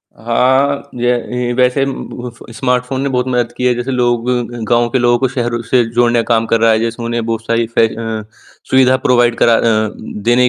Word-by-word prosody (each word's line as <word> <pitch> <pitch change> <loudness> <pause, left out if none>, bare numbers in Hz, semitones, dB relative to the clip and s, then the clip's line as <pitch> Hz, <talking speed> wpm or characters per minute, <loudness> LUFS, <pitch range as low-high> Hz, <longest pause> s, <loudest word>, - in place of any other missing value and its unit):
हाँ, 130 +5 +1
य 120 - -5 0.3
येही 125 0 -2
वैसे 125 +2 +2
बुफ़ 125 -3 -7 0.2
स्मार्टफ़ोन 125 +1 -1
ने 140 - -1
बहुत 125 -1 -1
मदद 120 -2 0
की 125 - -2
है, 125 - +4
जैसे 120 +2 -3
लोग 120 -1 0
ग 120 -1 -3
गाँव 120 0 +3
के 130 - 0
लोगों 120 0 +3
को 130 - +2
शहरों 120 -2 -2
से 120 +1 +2
जोड़ने 120 0 +3
का - - +1
काम 115 0 +1
कर 115 0 +1
रहा 115 0 +5
है, 110 - +2
जैसे 115 +1 -3
उन्हें 115 -1 -2
बहुत 115 0 -3
सारी 115 0 0
फै 115 0 +2
अ, 110 -1 -5 0.5
सुविधा 130 0 +4
प्रोवाइड 120 -1 +3
करा 115 - +4
अ 110 -1 +2
उम, 110 - -10
देने 120 +3 +3
120 Hz, 215 wpm, -15 LUFS, 115-125 Hz, 0.5 s, रहा